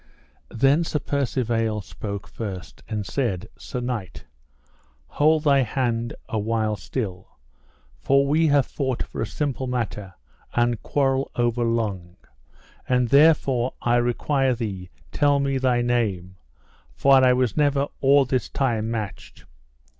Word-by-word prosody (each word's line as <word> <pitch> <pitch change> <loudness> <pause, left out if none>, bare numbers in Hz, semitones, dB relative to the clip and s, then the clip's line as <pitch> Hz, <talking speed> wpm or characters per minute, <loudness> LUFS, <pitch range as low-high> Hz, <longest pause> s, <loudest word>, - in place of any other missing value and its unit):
Then 135 +7 +3
Sir 160 - -2
Percivale 120 -6 -1
spoke 100 +1 -7
first, 95 -6 -7
and 105 -2 -3
said: 105 -4 -2
Sir 125 - -6
knight, 120 -7 -5 0.8
hold 155 +1 +2
thy 140 -3 +4
hand 120 -1 -1
a 110 - -2
while 110 0 0
still, 95 -2 -6 0.6
for 140 0 +3
we 155 +3 +2
have 145 -3 +3
fought 130 -4 -2
for - - -7
a 110 - -1
simple 135 0 -3
matter 110 -6 -4 0.4
and 120 -1 +1
quarrel 135 -1 0
overlong, 115 -7 -1 0.7
and 125 -2 +2
therefore 140 -4 +4
I 120 0 +2
require 130 +2 +1
thee 95 -6 -5 0.2
tell 145 -1 +2
me 135 -1 0
thy 125 -2 +2
name, 100 -7 -1 0.6
for 135 -1 +5
I 125 -1 +6
was 125 -3 0
never 145 -2 +2
or 140 0 +5
this 130 0 -1
time 115 -5 -1
matched. 110 -3 -6
120 Hz, 130 wpm, -24 LUFS, 110-135 Hz, 0.8 s, I